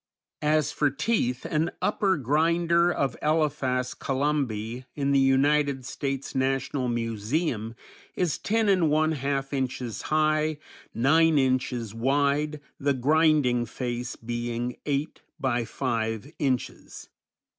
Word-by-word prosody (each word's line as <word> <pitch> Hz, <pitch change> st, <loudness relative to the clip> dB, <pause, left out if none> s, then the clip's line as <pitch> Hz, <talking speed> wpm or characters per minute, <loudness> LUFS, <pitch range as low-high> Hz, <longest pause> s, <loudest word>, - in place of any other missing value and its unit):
As 150 Hz, -1 st, +2 dB
for 145 Hz, -, +1 dB
teeth, 140 Hz, -, -1 dB
an 160 Hz, +1 st, 0 dB
upper 195 Hz, -1 st, +1 dB
grinder 170 Hz, +5 st, +2 dB
of 140 Hz, -5 st, -1 dB
Elephas 135 Hz, -5 st, 0 dB
columbi 130 Hz, -4 st, -2 dB
in 140 Hz, -1 st, 0 dB
the 140 Hz, -, +4 dB
United 135 Hz, 0 st, +2 dB
States 135 Hz, +1 st, -4 dB
National 135 Hz, 0 st, 0 dB
Museum 115 Hz, +1 st, -2 dB, 0.4 s
is 175 Hz, -5 st, 0 dB
ten 220 Hz, +1 st, +1 dB
and 185 Hz, -5 st, +3 dB
one 155 Hz, +1 st, +2 dB
half 140 Hz, -1 st, -2 dB
inches 130 Hz, -3 st, -3 dB
high, 155 Hz, 0 st, +2 dB, 0.4 s
nine 160 Hz, +5 st, +4 dB
inches 130 Hz, -4 st, 0 dB
wide, 140 Hz, +5 st, +1 dB, 0.2 s
the 140 Hz, 0 st, +1 dB
grinding 140 Hz, -3 st, +3 dB
face 120 Hz, +1 st, -4 dB
being 120 Hz, +1 st, -3 dB
eight 145 Hz, +1 st, -2 dB, 0.2 s
by 125 Hz, -4 st, 0 dB
five 115 Hz, +1 st, -2 dB
inches. 130 Hz, -5 st, -3 dB
140 Hz, 115 wpm, -26 LUFS, 125-155 Hz, 0.4 s, the